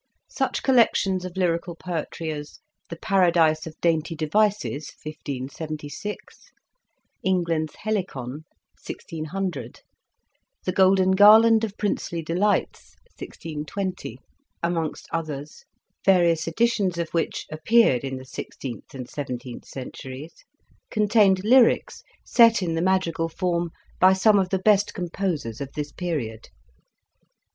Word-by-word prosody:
Such - - -1
collections 200 -7 +3
of 185 0 -8
lyrical 170 -1 0
poetry 165 -2 -4
as 150 -1 -7 0.2
" - - -46
The 170 - -5
Paradise 165 -4 +2
of 155 - -10
Dainty 165 0 +1
Devices, 160 -1 0
1576," 155 +5 -7 0.7
"England's 170 -4 0
Helicon, 155 - -4 0.4
1600," 175 +4 -5 0.8
"The 185 - +1
Golden 190 0 +4
Garland 220 +3 +7
of 210 -2 -3
Princely 175 -4 -2
Delights, 185 +6 -1 0.2
1620," 165 - -5 0.5
amongst 165 -2 -2
others, 150 -3 -5 0.4
various 170 -4 +3
editions 200 -1 +1
of 170 -1 -2
which 165 -1 -2
appeared 155 - +3
in 135 -1 -4
the 130 - -10
sixteenth 130 -1 -8
and 125 -2 -6
seven 140 -4 -4
teenth 120 -1 -10
centuries, 130 +3 -8 0.6
contained 210 -3 +3
lyrics 240 +2 +4 0.2
set 230 -4 +5
in 165 -2 -1
the 165 - -1
madrigal 175 -3 +1
form 175 0 -1 0.3
by 185 +1 +7
some 205 +2 +4
of 185 -1 0
the 190 - +1
best 205 +1 +2
composers 170 - -3
of 140 -1 -5
this 150 -1 -4
period. 135 -12 -4
170 Hz, 115 wpm, -24 LUFS, 155-195 Hz, 0.8 s, Garland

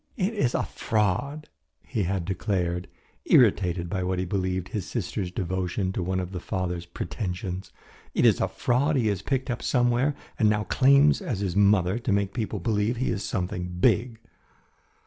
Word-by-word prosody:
"It 200 +1 0
is 130 - +1
a - - +1
fraud," 115 +8 -1 0.4
he 115 -5 -2
had 95 -1 -1
declared, 90 -2 -1 0.4
irritated 90 -7 +4
by 95 +2 -2
what 90 0 -1
he 90 - -1
believed 95 0 -2
his 105 -6 -4
sister's 95 -3 -3
devotion 95 +1 -2
to - - -2
one 95 +1 -1
of 90 0 -4
the 90 - -4
father's 90 -1 -3
pretensions. 90 +2 -5 0.4
"It - - +3
is - - +5
a - - +2
fraud 140 +5 +1
he 115 -5 +2
has 100 -3 -1
picked 130 +4 -1
up 120 - -3
somewhere 125 +3 +2 0.2
and 110 - +5
now 105 0 +1
claims 140 - +4
as 125 - -3
his 95 -3 -2
mother 100 0 +3
to 120 -2 -2
make 100 0 +1
people 110 -3 -2
believe 105 +4 0
he 130 - 0
is 100 - -2
something 90 -3 -3
big." 115 +5 +2
100 Hz, 175 wpm, -26 LUFS, 90-120 Hz, 0.4 s, is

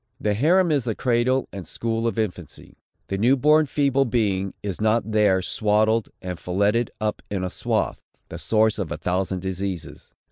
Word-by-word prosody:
The 105 - 0
harem 170 - +3
is 140 -5 +1
the 115 -3 -1
cradle 130 +1 +1
and 95 -5 -7
school 115 0 -2
of 115 - -2
infancy. 90 -7 -5 0.3
The 95 - -2
new 125 +6 +4
born 150 +3 +4
feeble 140 -1 +2
being 100 -6 0
is 100 -1 -4
not 110 0 +1
there 100 -4 +3
swaddled 110 +2 +1
and 90 -2 -5
filletted 100 +6 +1
up 110 -1 -2
in 100 -2 -2
a 90 - -3
swathe, - - -1 0.3
the - - -7
source 110 -1 +2
of 95 -5 -3
a - - -3
thousand 95 0 -1
diseases. 95 -2 -5
110 Hz, 175 wpm, -23 LUFS, 95-120 Hz, 0.3 s, new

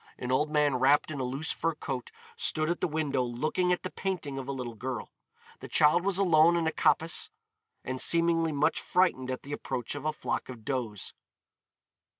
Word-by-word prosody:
An 125 0 -4
old 150 +4 +2
man 150 -3 +2
wrapped 140 +4 +3
in 145 - -4
a - - -1
loose 135 +6 -2
fur 165 -1 -1
coat 135 -4 -5 0.3
stood 155 +1 +2
at 175 - -3
the - - +2
window 150 -4 0
looking 155 +9 0
at 180 - 0
the 185 - -4
painting 165 -8 -3
of 135 - -7
a - - -2
little 125 -3 -5
girl. 125 +1 -5 0.5
The - - -8
child 155 +4 +4
was 195 -1 +1
alone 170 -3 +5
in 170 -1 +1
a 160 - +1
coppice 165 +1 +1 0.5
and 130 0 -3
seemingly 165 -1 +3
much 145 0 +1
frightened 170 -8 +1
at 130 - -4
the 145 - -6
approach 125 -4 -3
of 145 0 -7
a 155 - +2
flock 150 - -3
of 120 -4 -9
does. 120 -7 -3
150 Hz, 195 wpm, -29 LUFS, 130-165 Hz, 0.5 s, alone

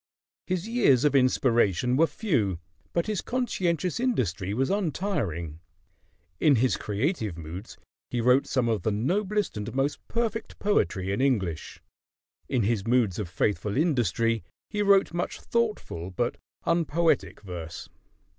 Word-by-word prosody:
His 185 +1 -1
years 225 - +4
of 150 - +3
inspiration 125 -4 +3
were 165 +4 +4
few; 115 - 0 0.3
but 170 - 0
his 215 -3 -1
conscientious 185 - -1
industry 100 - 0
was 130 - 0
untiring. 145 - -2 0.8
In 145 - +5
his 125 +2 +2
creative 105 - -2
moods 85 +6 -8 0.3
he 120 - -2
wrote 125 +3 +4
some 130 -3 +1
of 110 -2 0
the 110 - 0
noblest 190 - 0
and 105 +2 -4
most 135 +2 0
perfect 230 -1 -2
poetry 95 - +1
in 100 - 0
English; 95 - -1 0.7
in 125 -4 +1
his 105 -1 0
moods 115 -6 +2
of 100 -5 -3
faithful 105 +4 -1
industry 115 - +1 0.3
he 210 -1 -1
wrote 200 -3 +4
much 175 +1 -3
thoughtful 210 - -2
but 120 +6 -1 0.3
unpoetic 165 - +1
verse. 85 -4 -7
125 Hz, 135 wpm, -27 LUFS, -, 0.8 s, In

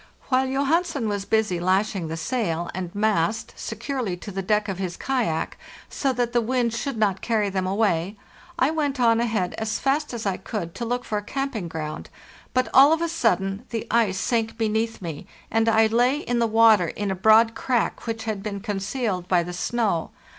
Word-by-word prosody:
While 260 0 +3
Johansen 280 0 0
was 205 -2 -2
busy 215 -5 +1
lashing 190 0 +1
the 165 +1 -4
sail 175 -4 -2
and 180 -1 -4
mast 215 +1 0
securely 230 -4 -4
to 205 - -8
the 195 0 -3
deck 210 +2 +1
of 190 -2 -4
his 185 -2 -3
kayak, 230 -12 -1 0.3
so 275 - 0
that 245 -1 -1
the 240 - +3
wind 240 0 0
should 240 +2 -3
not 200 -3 +1
carry 215 -4 0
them 190 -1 -1
away, 195 -1 0 0.4
I 265 +4 +3
went 290 -4 -1
on 230 -2 +4
ahead 215 -6 0
as 220 0 -1
fast 290 +2 0
as 235 -3 -5
I 195 -2 0
could 190 -4 -5
to 235 - -4
look 245 +1 -2
for 210 - -1
a - - -10
camping 270 -6 -3
ground; 155 -2 -6 0.4
but 255 0 +1
all 275 +3 +8
of 325 - 0
a - - +1
sudden 195 - 0
the 230 -1 -3
ice 220 -4 +2
sank 225 0 -1
beneath 220 -1 -1
me, 160 -4 -6 0.2
and 225 0 +3
I 220 0 +5
lay 245 +5 +3
in 245 -4 -1
the 230 - +3
water 220 -5 +5
in 200 +3 -3
a - - -1
broad 220 +4 +5
crack 245 -1 -1
which 225 -1 -3
had 215 -3 -3
been 200 -1 -4
concealed 195 -1 -2
by 180 -2 +3
the 175 +1 -6
snow. 200 -3 -1
220 Hz, 195 wpm, -24 LUFS, 195-240 Hz, 0.4 s, all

